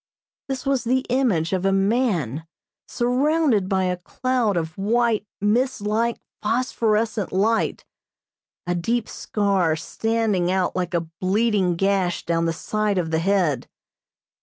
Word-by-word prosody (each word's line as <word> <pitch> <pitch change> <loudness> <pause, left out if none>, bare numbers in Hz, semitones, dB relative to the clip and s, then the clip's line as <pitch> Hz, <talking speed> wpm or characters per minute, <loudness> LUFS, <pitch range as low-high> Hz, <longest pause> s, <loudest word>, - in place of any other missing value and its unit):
This 270 0 -4
was 270 -3 +1
the 255 +2 +1
image 220 -11 +1
of 185 -1 0
a 195 - +3
man 195 - 0 0.4
surrounded 250 - +1
by 190 -1 +1
a 180 -1 0
cloud 235 +2 -1
of 160 -1 -3
white, 220 +1 +1
mist 235 +6 +1
like 220 +3 0 0.2
phosphorescent 220 -2 0
light, 220 +4 +1 0.8
a 175 - 0
deep 225 +7 -1
scar 195 -6 0
standing 210 +2 0
out 185 -1 0
like 180 -1 -2
a 170 - +2 0.2
bleeding 195 -2 +2
gash 190 -1 0
down 165 0 +1
the 165 - +1
side 210 +3 -1
of 165 -3 -1
the 160 - +1
head. 170 -7 +1
205 Hz, 135 wpm, -23 LUFS, 180-235 Hz, 0.8 s, a